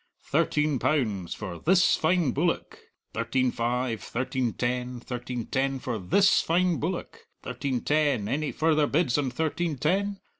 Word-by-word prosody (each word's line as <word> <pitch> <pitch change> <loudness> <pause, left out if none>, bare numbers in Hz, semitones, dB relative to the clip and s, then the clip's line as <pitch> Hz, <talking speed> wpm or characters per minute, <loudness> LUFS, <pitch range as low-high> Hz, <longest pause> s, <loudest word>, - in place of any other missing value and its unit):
"Thirteen 150 -3 +1
pounds 110 - 0
for 95 -5 -6
this 180 +1 +4
fine 165 -3 +2
bullock; 165 +7 -1 0.3
thirteen 125 +2 0
five; 120 -2 -1
thirteen 125 +2 -2
ten; 125 0 -2
thirteen 120 -1 -5
ten 135 0 0
for 125 -3 -4
this 195 - +4
fine 175 -1 +1
bullock; 170 +3 -4 0.2
thirteen 130 -4 -2
ten; 145 -8 +1
any 145 +5 -1
further 155 -2 +2
bids 150 -3 +1
on 135 -3 0
thirteen 160 +3 -2
ten? 195 +8 0
135 Hz, 140 wpm, -27 LUFS, 120-160 Hz, 0.3 s, this